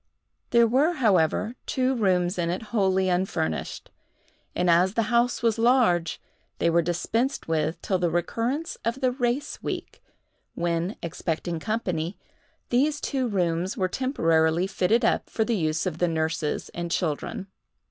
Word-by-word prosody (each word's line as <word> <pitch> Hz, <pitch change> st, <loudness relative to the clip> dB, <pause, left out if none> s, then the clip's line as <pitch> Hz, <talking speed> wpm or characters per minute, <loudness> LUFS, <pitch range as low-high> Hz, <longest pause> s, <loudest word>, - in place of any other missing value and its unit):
There 235 Hz, -1 st, +5 dB
were, 270 Hz, +9 st, +3 dB
however, 215 Hz, -, +2 dB
two 260 Hz, 0 st, +1 dB
rooms 185 Hz, -5 st, +1 dB
in 170 Hz, -1 st, 0 dB
it 180 Hz, +6 st, -2 dB
wholly 190 Hz, -3 st, +2 dB
unfurnished; 180 Hz, -, -2 dB, 0.6 s
and 180 Hz, -, +1 dB
as 180 Hz, +4 st, +4 dB
the 230 Hz, -, +2 dB
house 235 Hz, 0 st, +2 dB
was 225 Hz, -1 st, +2 dB
large, 200 Hz, -9 st, +3 dB, 0.4 s
they 170 Hz, -, +2 dB
were 170 Hz, +1 st, +4 dB
dispensed 225 Hz, -, -1 dB
with 160 Hz, 0 st, 0 dB
till 190 Hz, -2 st, 0 dB
the 175 Hz, -1 st, +1 dB
recurrence 230 Hz, -, -2 dB
of 235 Hz, +3 st, -1 dB
the 255 Hz, -1 st, +3 dB
race 245 Hz, +2 st, -2 dB
week, -, -, -5 dB, 0.5 s
when, 170 Hz, +3 st, -1 dB
expecting 170 Hz, 0 st, -3 dB
company, 180 Hz, -4 st, -2 dB, 0.5 s
these 290 Hz, +4 st, +2 dB
two 265 Hz, -3 st, -1 dB
rooms 180 Hz, -3 st, -1 dB
were 185 Hz, -, +1 dB
temporarily 165 Hz, -, +1 dB
fitted 210 Hz, +4 st, +1 dB
up -, -, +1 dB
for 220 Hz, -, 0 dB
the 235 Hz, -, 0 dB
use 155 Hz, -3 st, 0 dB
of 170 Hz, -3 st, -3 dB
the 175 Hz, -, +3 dB
nurses 160 Hz, -2 st, -1 dB
and 170 Hz, 0 st, -5 dB
children. 165 Hz, +2 st, -2 dB
185 Hz, 145 wpm, -26 LUFS, 170-235 Hz, 0.6 s, There